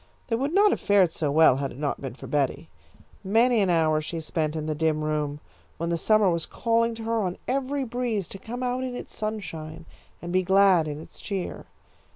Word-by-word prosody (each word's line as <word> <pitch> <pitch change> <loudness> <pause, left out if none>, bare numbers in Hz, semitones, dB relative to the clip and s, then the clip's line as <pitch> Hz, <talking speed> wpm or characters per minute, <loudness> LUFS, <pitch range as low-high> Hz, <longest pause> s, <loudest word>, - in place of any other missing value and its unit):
They 230 - +2
would 275 +5 -1
not 405 +3 +5
have - - 0
fared 195 -5 +4
so 155 -3 -1
well 155 -3 +6
had 140 -1 -3
it - - -11
not 145 -1 -2
been 135 -3 -6
for - - -10
Betty. 145 +2 -1 0.5
Many 230 +4 +3
an 195 - +2
hour 160 -2 +3
she 165 +2 -5
spent 155 -1 -2
in 155 -1 -3
the 155 - -1
dim 155 0 0
room, 150 -1 -2 0.4
when 170 +1 -2
the - - +2
summer 215 +4 +3
was 170 -1 -2
calling 230 0 +1
to 225 - -8
her 225 0 0
on 180 -3 -2
every 275 +1 -1
breeze 235 -6 -2
to 195 - -8
come 245 +5 -6
out 250 +1 -1
in 255 -1 -4
its - - -8
sunshine 165 -7 -5 0.3
and 175 +1 -6
be 185 - +4
glad 190 -3 +4
in 150 0 -5
its 160 - -13
cheer. 195 -3 -4
180 Hz, 215 wpm, -26 LUFS, 155-230 Hz, 0.5 s, well